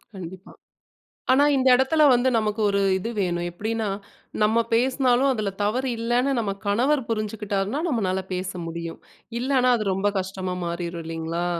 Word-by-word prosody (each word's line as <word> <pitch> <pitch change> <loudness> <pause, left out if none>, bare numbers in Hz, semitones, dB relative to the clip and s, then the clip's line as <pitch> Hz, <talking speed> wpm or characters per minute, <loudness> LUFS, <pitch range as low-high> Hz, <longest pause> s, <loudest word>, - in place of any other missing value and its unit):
கண்டிப்பா. 185 +1 -9 0.8
ஆனா, 280 +2 +5
இந்த 260 0 +3
எடத்தில 285 +4 +3
வந்து 245 +2 +2
நமக்கு 215 0 -1
ஒரு 200 0 +1 0.2
இது 225 +5 -4
வேணும். 175 -2 -1
எப்படின்னா, 220 +3 -2 0.5
நம்ம 220 +2 +3
பேசினாலும் 255 +1 +3
அதுல 215 -4 -2
தவறு 255 +5 0
இல்லைன்னு, 240 +4 +1
நம்ம 200 -3 -2
கணவர் 250 +6 +2
புரிஞ்சுகிட்டார்னா 210 +2 -2
நம்மளால 190 -8 0
பேச 185 +1 -3
முடியும். 165 0 -6 0.4
இல்லைனா 255 -1 +2
அது 215 -2 -3
ரொம்ப 200 +2 +1
கஷ்டமா 185 -1 -4
மாறிரும் 170 0 -4
இல்லைங்களா? 165 +1 -3
210 Hz, 140 wpm, -24 LUFS, 185-250 Hz, 0.8 s, ஆனா